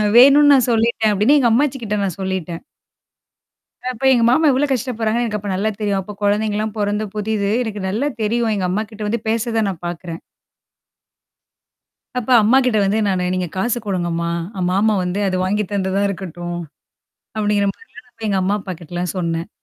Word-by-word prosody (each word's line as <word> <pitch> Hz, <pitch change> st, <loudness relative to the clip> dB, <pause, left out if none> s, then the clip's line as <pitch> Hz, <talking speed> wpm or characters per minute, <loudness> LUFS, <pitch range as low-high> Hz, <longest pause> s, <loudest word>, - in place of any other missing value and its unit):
வேணும்னு 280 Hz, +3 st, +8 dB
நான் 260 Hz, -3 st, +4 dB
சொல்லிட்டேன்" 225 Hz, -1 st, +2 dB
அப்டின்னு, 215 Hz, +9 st, +4 dB
எங்க 240 Hz, -3 st, +3 dB
அம்மாச்சி 270 Hz, +3 st, +2 dB
கிட்ட 210 Hz, -2 st, -2 dB
நான் 190 Hz, -3 st, -3 dB
சொல்லிட்டேன். 185 Hz, -3 st, -3 dB, 1.3 s
அப்ப 250 Hz, +2 st, -10 dB
எங்க 240 Hz, -3 st, +4 dB
மாமா 305 Hz, +4 st, +4 dB
எவ்வளோ 280 Hz, +3 st, +1 dB
கஷ்டப்படுறாங்கன்னு 235 Hz, -2 st, -1 dB
எனக்கு 210 Hz, -2 st, -2 dB
அப்ப 205 Hz, 0 st, -6 dB
நல்லா 210 Hz, +3 st, 0 dB
தெரியும். 200 Hz, -2 st, 0 dB
அப்ப 205 Hz, +2 st, -9 dB
கொழந்தைங்கலாம் 210 Hz, +1 st, 0 dB
பொறந்த 210 Hz, +1 st, -1 dB
புதிது. 210 Hz, -1 st, -1 dB
எனக்கு 210 Hz, -3 st, -5 dB
நல்லா 230 Hz, +9 st, -1 dB, 0.2 s
தெரியும். 230 Hz, +1 st, +1 dB
எங்க 185 Hz, -2 st, -1 dB
அம்மாகிட்ட 215 Hz, +2 st, -3 dB
வந்து 225 Hz, +1 st, -1 dB
பேசறத 225 Hz, 0 st, 0 dB
நான் 175 Hz, -2 st, -7 dB
பாக்குறேன். 170 Hz, -1 st, -6 dB, 2.0 s
அப்ப 245 Hz, -, -8 dB
அம்மாகிட்ட 250 Hz, +1 st, +3 dB
வந்து 205 Hz, +3 st, +1 dB
நானு 185 Hz, -2 st, 0 dB
நீங்க 180 Hz, -1 st, -1 dB
காசு 240 Hz, +4 st, 0 dB
குடுங்கம்மா? 170 Hz, -3 st, -1 dB, 0.3 s
அ -, -, -2 dB
மாமா 210 Hz, +3 st, +2 dB
வந்து 180 Hz, +3 st, -2 dB
அத 185 Hz, -, -1 dB
வாங்கி 210 Hz, +2 st, 0 dB
தந்ததா 195 Hz, 0 st, 0 dB
இருக்கட்டும். 175 Hz, -2 st, -5 dB, 0.8 s
அப்படிங்கிற 210 Hz, -1 st, +1 dB
மாரிலாம் 450 Hz, -1 st, -16 dB
நான் -, -, -27 dB
வந்து 225 Hz, -2 st, -6 dB
எங்க 195 Hz, -2 st, +1 dB
அம்மா 195 Hz, +2 st, +1 dB
அப்பா 185 Hz, -, -6 dB
கிட்டலாம் 175 Hz, +2 st, -4 dB
சொன்னேன். 170 Hz, 0 st, -2 dB
210 Hz, 165 wpm, -19 LUFS, 190-230 Hz, 2.0 s, வேணும்னு